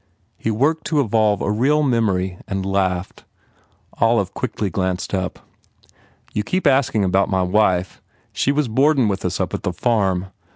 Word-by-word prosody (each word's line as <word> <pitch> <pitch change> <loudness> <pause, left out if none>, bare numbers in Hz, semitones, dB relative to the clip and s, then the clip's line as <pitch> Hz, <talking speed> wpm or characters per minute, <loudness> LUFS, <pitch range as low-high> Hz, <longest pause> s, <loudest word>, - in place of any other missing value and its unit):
He - - -3
worked 140 +9 0
to 155 - +1
evolve 110 -4 +2
a 100 - 0
real 140 +8 +2
memory 95 -8 0
and 95 -2 -3
laughed. 95 -1 -1 0.8
Olive 115 -4 +2
quickly 105 -5 -3
glanced 95 0 -2
up. 95 -1 -2 1.0
"You 105 - 0
keep 185 - -2
asking 135 -7 +3
about 95 +1 +2
my 95 -1 +1
wife. 90 -1 +1 0.3
She 140 - +1
was 145 -1 0
boardin 135 +2 +3
with 95 -2 -2
us 90 -1 -2
at - - -1
the 90 - -2
farm. 95 -2 0
105 Hz, 155 wpm, -20 LUFS, 95-125 Hz, 1.0 s, asking